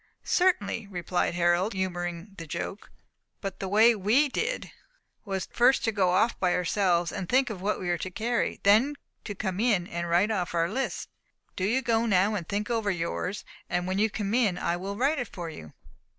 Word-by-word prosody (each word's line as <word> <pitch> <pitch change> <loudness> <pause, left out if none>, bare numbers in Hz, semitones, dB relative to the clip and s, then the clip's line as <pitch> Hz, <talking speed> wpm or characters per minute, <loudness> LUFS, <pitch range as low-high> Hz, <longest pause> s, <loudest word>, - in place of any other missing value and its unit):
"Certainly," 235 - +1
replied 175 -2 -1
Harold, 175 +4 +2
humouring 175 0 -3
the 165 - -7
joke. 175 +5 -5 0.5
"But 195 -2 -5
the 195 - -3
way 220 +5 +6
we 225 +9 +3
did, 455 - -2 0.5
was 195 -3 -3
first 245 +2 +4
to 225 - +2
go 195 -4 +2
off 190 +6 +2
by 180 -2 +2
ourselves, 180 -1 +1
and 185 - -5
think 260 -1 +3
of 190 -4 -7
what 205 +2 -1
we 180 - -4
were 175 -1 0
to 185 - -4
carry; 230 +5 -1
then 225 +9 +4 0.3
to 205 - -5
come 190 -2 -3
in 215 -6 +2
and 170 -1 -4
write 180 +6 +3
off 180 -5 -2
our 165 0 +2
lists. 265 +4 -2 0.5
Do 185 - -1
you 250 +6 +1
go 230 -1 +1
now 200 +1 +3
and 180 -6 -4
think 210 +3 -2
over 225 -3 0
yours, 180 +2 -3 0.2
and 180 0 -1
when 185 +1 -1
you 220 +1 +3
come 205 0 -3
in 220 -7 +2
I 170 - 0
will 195 +3 -5
write 280 +5 +2
it 245 - -3
for 170 -2 -7
you." 80 - -11
195 Hz, 200 wpm, -27 LUFS, 175-225 Hz, 0.5 s, way